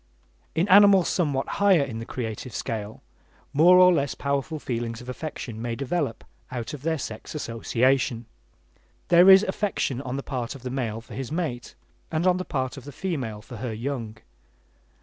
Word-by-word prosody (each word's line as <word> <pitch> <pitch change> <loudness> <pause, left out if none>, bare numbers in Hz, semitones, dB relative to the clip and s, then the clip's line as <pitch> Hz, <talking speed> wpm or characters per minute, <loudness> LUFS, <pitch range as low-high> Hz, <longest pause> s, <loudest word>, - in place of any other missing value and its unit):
In 170 +4 +2
animals 200 -1 +7
somewhat 145 -7 0
higher 190 -7 +5
in 120 -5 -5
the 115 - -7
creative 115 -1 -5
scale, 110 -1 -5 0.5
more 175 +5 +7
or 180 0 +7
less 140 -4 0
powerful 140 +2 -2
feelings 115 -4 -4
of 125 - -10
affection 125 -5 -6
may 120 0 -3
develop 140 0 -2 0.3
out 120 0 -5
of 145 - -7
their 160 +2 0
sex 110 +1 -7
association. 120 -1 0 0.8
There 175 +2 +7
is 190 +1 +9
affection 190 - -1
on 130 -1 -4
the 140 - -4
part 125 -2 -4
of 130 - -12
the 125 - -4
male 115 -4 -3
for 115 - -13
his 135 0 -5
mate, 155 -8 -3 0.4
and 160 +2 0
on 180 -1 +4
the 185 - -4
part 130 0 -3
of 135 - -9
the 145 - -8
female 130 - -4
for 120 - -10
her 115 +1 -4
young. 115 -2 -4
135 Hz, 175 wpm, -25 LUFS, 120-165 Hz, 0.8 s, is